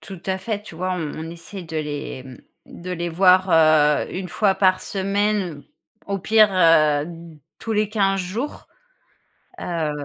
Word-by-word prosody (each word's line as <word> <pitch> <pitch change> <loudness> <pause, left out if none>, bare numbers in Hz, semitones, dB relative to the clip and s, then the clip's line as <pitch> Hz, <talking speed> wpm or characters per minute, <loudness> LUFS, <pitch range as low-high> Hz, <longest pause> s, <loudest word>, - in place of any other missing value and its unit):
Tout 190 -4 -10
à 190 0 -1
fait, 210 +1 -4
tu 190 - -12
vois, 185 +2 -2
on 160 -4 -4
on 160 +1 -6
essaie 170 +3 -9
de 160 -1 -7
les, 145 -3 -5
mmh, 130 -1 -12 0.4
de 180 - -6
les 175 -1 -3
voir, 185 +2 +4
heu, 155 -2 +4
1 185 0 -5
fois 195 +3 +1
par 185 -1 +3
semaine, 195 -5 -1 0.4
au 200 -1 -2
pire, 215 +2 +4
heu, 155 -4 +4 0.5
tous 225 - -4
les 210 -1 +1
15 195 -3 +1
jours. 215 +11 -5 0.9
Heu 165 -3 -2
185 Hz, 160 wpm, -22 LUFS, 160-195 Hz, 0.9 s, voir